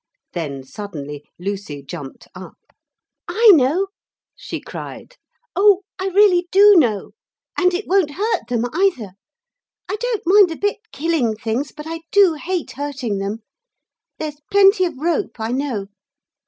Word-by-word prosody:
Then 140 Hz, -6 st, -4 dB
suddenly 145 Hz, -3 st, -8 dB
Lucy 190 Hz, -6 st, -5 dB
jumped 140 Hz, -2 st, -9 dB
up. -, -, -11 dB, 0.7 s
'I 430 Hz, +5 st, +6 dB
know,' 315 Hz, +6 st, +3 dB, 0.5 s
she -, -, -6 dB
cried, -, -, -9 dB, 0.4 s
'oh 400 Hz, +1 st, +5 dB, 0.2 s
I 380 Hz, -, -2 dB
really 375 Hz, -2 st, +4 dB
do 405 Hz, +1 st, +7 dB
know. 225 Hz, -, +2 dB, 0.4 s
And 365 Hz, -1 st, +3 dB
it 370 Hz, +4 st, -3 dB
won't 375 Hz, -5 st, +2 dB
hurt 415 Hz, -, -1 dB
them 240 Hz, -1 st, 0 dB
either. 325 Hz, -, +1 dB, 0.8 s
I 415 Hz, -, -3 dB
don't 415 Hz, -5 st, +4 dB
a -, -, -4 dB
bit -, -, -18 dB
mind 410 Hz, -, +1 dB
killing 285 Hz, -8 st, 0 dB
things, 230 Hz, +6 st, -3 dB
but 300 Hz, 0 st, -10 dB
I 330 Hz, 0 st, -5 dB
do 400 Hz, -4 st, +5 dB
hate 345 Hz, +2 st, -4 dB
hurting 265 Hz, -7 st, -4 dB
them. 205 Hz, +3 st, -4 dB, 0.7 s
There's 300 Hz, -1 st, -6 dB
plenty 395 Hz, -1 st, +5 dB
of 335 Hz, -6 st, -4 dB
rope, 295 Hz, -7 st, -2 dB
I 220 Hz, +1 st, -2 dB
know.' 255 Hz, -6 st, -2 dB
300 Hz, 140 wpm, -20 LUFS, -, 0.8 s, do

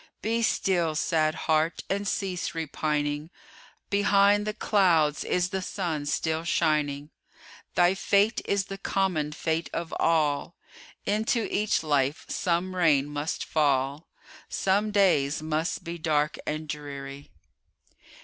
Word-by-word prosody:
Be 230 Hz, +2 st, 0 dB
still, 175 Hz, -7 st, +1 dB
sad 155 Hz, 0 st, +1 dB
heart! 160 Hz, +1 st, +1 dB
and 200 Hz, +1 st, -2 dB
cease 185 Hz, -4 st, -2 dB
repining; 150 Hz, -1 st, -2 dB, 0.6 s
Behind 205 Hz, +1 st, +4 dB
the 215 Hz, -, -1 dB
clouds 165 Hz, -10 st, +2 dB
is 180 Hz, 0 st, 0 dB
the 190 Hz, 0 st, -2 dB
sun 165 Hz, -6 st, -3 dB
still 160 Hz, +2 st, -1 dB
shining; 150 Hz, -3 st, 0 dB, 0.6 s
Thy 175 Hz, +1 st, +4 dB
fate 200 Hz, +3 st, +2 dB
is 200 Hz, -1 st, 0 dB
the 195 Hz, 0 st, -7 dB
common 185 Hz, -7 st, 0 dB
fate 160 Hz, +2 st, -2 dB
of 170 Hz, -1 st, -4 dB
all, 155 Hz, 0 st, +1 dB, 0.5 s
Into 220 Hz, +2 st, 0 dB
each 210 Hz, -4 st, +1 dB
life 145 Hz, -1 st, 0 dB
some 180 Hz, +1 st, -1 dB
rain 155 Hz, -6 st, +3 dB
must 145 Hz, +1 st, -3 dB
fall, 140 Hz, 0 st, 0 dB, 0.4 s
Some 200 Hz, +3 st, +1 dB
days 165 Hz, -8 st, +2 dB
must 160 Hz, +3 st, -2 dB
be 170 Hz, 0 st, -6 dB
dark 155 Hz, -1 st, 0 dB
and 155 Hz, +1 st, -3 dB
dreary. 140 Hz, -1 st, -7 dB
165 Hz, 120 wpm, -27 LUFS, 150-195 Hz, 0.6 s, Behind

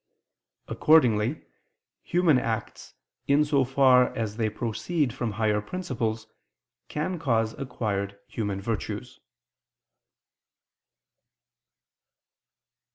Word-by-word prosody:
Accordingly 125 Hz, -4 st, +3 dB, 0.6 s
human 170 Hz, -6 st, +3 dB
acts, 115 Hz, -2 st, -4 dB, 0.3 s
in 145 Hz, +2 st, +4 dB
so 145 Hz, -2 st, +2 dB
far 130 Hz, -1 st, +5 dB
as 110 Hz, -3 st, -3 dB
they 110 Hz, -2 st, +1 dB
proceed 120 Hz, +6 st, -2 dB
from 115 Hz, -4 st, -3 dB
higher 105 Hz, -1 st, +1 dB
principles, 115 Hz, -, -3 dB, 0.6 s
can 165 Hz, +4 st, -3 dB
cause 115 Hz, -6 st, +1 dB
acquired 100 Hz, -7 st, -3 dB
human 100 Hz, -3 st, -3 dB
virtues. 105 Hz, +1 st, -4 dB
120 Hz, 80 wpm, -26 LUFS, 110-140 Hz, 0.6 s, far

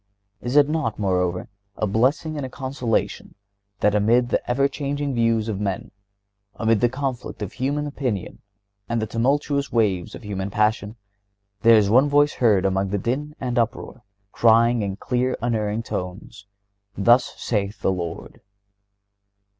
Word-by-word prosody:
Is 125 Hz, +3 st, -3 dB
it 145 Hz, -1 st, +6 dB
not, 150 Hz, -8 st, -1 dB
moreover, 90 Hz, -3 st, 0 dB, 0.3 s
a -, -, 0 dB
blessing 130 Hz, +9 st, +1 dB
and 145 Hz, -, -4 dB
a 130 Hz, -, -4 dB
consolation 130 Hz, -3 st, -3 dB, 0.5 s
that, 105 Hz, -, +3 dB
amid 115 Hz, +4 st, +3 dB
the -, -, +1 dB
ever 135 Hz, +3 st, +3 dB
changing 140 Hz, 0 st, -3 dB
views 115 Hz, -2 st, +1 dB
of 105 Hz, -3 st, -3 dB
men, 100 Hz, -3 st, -3 dB, 0.6 s
amid 110 Hz, -2 st, +1 dB
the 120 Hz, -, +4 dB
conflict 130 Hz, -4 st, -4 dB
of 100 Hz, -, -6 dB
human 140 Hz, +3 st, -1 dB
opinion 130 Hz, -9 st, -4 dB, 0.5 s
and 115 Hz, 0 st, 0 dB
the 110 Hz, -, -1 dB
tumultuous 140 Hz, +5 st, 0 dB
waves 100 Hz, -7 st, 0 dB
of -, -, -11 dB
human 100 Hz, -1 st, -3 dB
passion, 105 Hz, +1 st, 0 dB, 0.7 s
there 115 Hz, +1 st, +7 dB
is 105 Hz, -2 st, +3 dB
one 130 Hz, +5 st, +5 dB
voice 145 Hz, 0 st, +3 dB
heard 105 Hz, -6 st, +3 dB
above 95 Hz, 0 st, 0 dB
the 100 Hz, -, -1 dB
din 140 Hz, +9 st, -3 dB
and 125 Hz, -2 st, -1 dB
uproar, 115 Hz, +2 st, -3 dB, 0.3 s
crying 115 Hz, +1 st, +4 dB
in 100 Hz, -2 st, -2 dB
clear, 125 Hz, +3 st, -1 dB
unerring 110 Hz, -2 st, -1 dB
tones: 100 Hz, +1 st, -6 dB, 0.5 s
"Thus 120 Hz, +5 st, +3 dB
saith 105 Hz, -2 st, -2 dB
the -, -, +3 dB
Lord?" 85 Hz, -3 st, -6 dB
115 Hz, 150 wpm, -23 LUFS, 105-130 Hz, 0.7 s, there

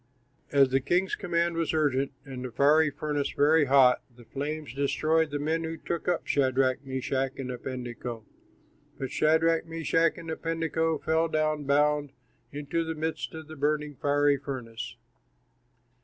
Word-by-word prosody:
As 140 Hz, -2 st, +5 dB
the 135 Hz, +1 st, +2 dB
king's 175 Hz, +8 st, 0 dB
command 170 Hz, -3 st, 0 dB
was 165 Hz, -1 st, 0 dB
urgent 140 Hz, -3 st, +1 dB
and 130 Hz, -2 st, -7 dB
the 125 Hz, -, -5 dB
furnace 150 Hz, +1 st, +2 dB
very 150 Hz, +2 st, +4 dB
hot, 130 Hz, -2 st, +5 dB
the 120 Hz, -1 st, -16 dB
flames 150 Hz, -1 st, -5 dB
destroyed 155 Hz, +3 st, +1 dB
the 145 Hz, -, -2 dB
men 160 Hz, +3 st, -1 dB
who 160 Hz, 0 st, -4 dB
took 170 Hz, 0 st, -4 dB
up 175 Hz, -1 st, 0 dB
Shadrach, 130 Hz, -1 st, +1 dB
Meshach, 130 Hz, 0 st, -2 dB
and 130 Hz, -2 st, -4 dB
Abednego. 120 Hz, -2 st, -6 dB, 0.7 s
But 135 Hz, -2 st, -4 dB
Shadrach, 160 Hz, +1 st, +2 dB
Meshach, 165 Hz, 0 st, +1 dB
and 165 Hz, -1 st, -6 dB
Abednego, 165 Hz, 0 st, -1 dB
fell 160 Hz, +2 st, +1 dB
down, 155 Hz, -2 st, 0 dB
bound, 145 Hz, 0 st, +2 dB, 0.4 s
into 145 Hz, +3 st, -2 dB
the 160 Hz, 0 st, -4 dB
midst 160 Hz, +1 st, -3 dB
of 160 Hz, -1 st, -8 dB
the 155 Hz, -, -9 dB
burning, 150 Hz, 0 st, -1 dB
fiery 145 Hz, +1 st, +2 dB
furnace. 125 Hz, -5 st, -6 dB
145 Hz, 145 wpm, -28 LUFS, 135-160 Hz, 0.7 s, As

